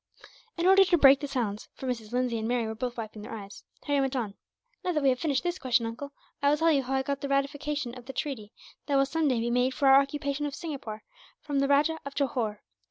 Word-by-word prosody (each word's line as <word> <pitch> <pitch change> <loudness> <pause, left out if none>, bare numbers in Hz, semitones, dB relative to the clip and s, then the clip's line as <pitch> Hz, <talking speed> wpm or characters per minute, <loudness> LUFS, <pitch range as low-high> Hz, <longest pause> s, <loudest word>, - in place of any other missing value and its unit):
In 340 - 0
order 385 +1 +7
to 355 -2 +3
break 275 -2 +7
the 285 - -4
silence, 230 -7 -3
for - - -8
Mrs. 230 -4 -4
Lindsay 245 -2 0
and 220 - -3
Mary 240 -1 0
were 220 - -3
both 245 +2 -4
wiping 220 -2 -6
their 225 +2 -7
eyes, 200 -2 -10 0.2
Harry 285 -1 +1
went 270 0 -1
on: 225 -6 -2 0.5
"Now 360 -1 0
that 300 -3 0
we 275 - +5
have 255 -1 +1
finished 280 -3 0
this 350 +1 -2
question, 245 -2 +1
uncle, 245 +5 -6 0.3
I 285 - +4
will 295 - +3
tell 325 +1 +3
you 280 -3 +3
how 265 +1 -2
I 265 - +1
got 280 0 -3
the 280 - -3
ratification 280 -1 -1
of 250 -1 -12
the 270 - -6
treaty, 245 -7 -4 0.4
that 285 - +1
will 275 0 +4
some 310 +3 0
day 255 -4 +2
be 235 +1 -1
made 250 +2 +1
for 280 - +2
our 270 +1 +8
occupation 285 +1 -2
of 285 - -6
Singapore, 270 -10 -6 0.4
from 285 -2 -2
the 275 - +2
Rajah 295 +3 +3
of 280 0 -8
Johore. 235 -7 -1
270 Hz, 255 wpm, -28 LUFS, 240-285 Hz, 0.5 s, our